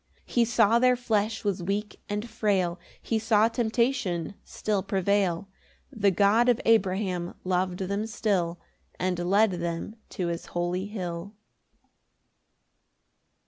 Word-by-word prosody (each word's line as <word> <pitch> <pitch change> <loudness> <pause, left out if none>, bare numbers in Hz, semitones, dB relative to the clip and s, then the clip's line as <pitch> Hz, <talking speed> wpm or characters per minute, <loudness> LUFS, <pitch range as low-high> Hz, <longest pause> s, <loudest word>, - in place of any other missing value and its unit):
7 - - -38
He 240 -1 +2
saw 230 0 +4
their 250 0 +4
flesh 220 -3 -1
was 200 -4 -1
weak 205 +4 -3
and 210 +3 -2
frail, 195 -6 0 0.2
He 225 - -1
saw 220 0 +4
temptation 225 - 0
still 210 -2 -2
prevail 195 -2 0 0.4
The 210 -6 +2
God 205 +6 +4
of 240 - +3
Abraham 190 -5 +1
lov'd 185 0 0
them 200 +3 -2
still, 180 -6 -1 0.4
And 180 -1 0
led 200 +4 +3
them 170 +4 -4 0.2
to 180 - 0
his 170 0 -4
holy 180 +2 -1
hill. 185 -1 -5
200 Hz, 125 wpm, -27 LUFS, 180-220 Hz, 0.4 s, saw